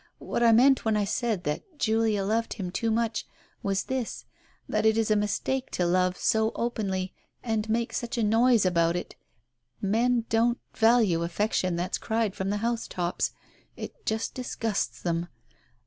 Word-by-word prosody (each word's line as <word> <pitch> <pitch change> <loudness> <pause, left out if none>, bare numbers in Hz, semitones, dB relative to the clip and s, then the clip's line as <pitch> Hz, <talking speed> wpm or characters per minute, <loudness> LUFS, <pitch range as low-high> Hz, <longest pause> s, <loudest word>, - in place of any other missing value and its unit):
What - - -3
I 235 -1 +6
meant 260 +4 +5
when 220 -1 +2
I 205 - +1
said 215 -2 -1
that 295 - -4
Julia 220 -4 +1
loved 225 +3 0
him 185 -5 -5
too 230 +4 -1
much, 225 -1 0 0.3
was 195 -1 0
this, 260 -3 -4 0.4
that - - 0
it 220 0 +4
is 225 -1 +1
a - - +5
mistake 230 +5 -1
to 180 - +1
love 180 +1 +2
so 220 -1 +2
openly 195 -5 -2 0.3
and 220 -2 -1
make 230 +1 0
such 235 0 -3
a 230 - +1
noise 225 0 +4
about 170 -2 +2
it. 175 - -4 0.7
Men 230 +4 +1
don't 235 +2 +2 0.2
value 225 -7 +4
affection 185 +1 0
that's 175 +2 -2
cried 220 -3 0
from 190 0 -3
the 205 - 0
house 235 -1 -1
tops. 175 -1 -2 0.4
It 475 - -8
just 220 +1 -1
disgusts 210 - -3
them. 170 0 -1
220 Hz, 165 wpm, -27 LUFS, 190-230 Hz, 0.7 s, I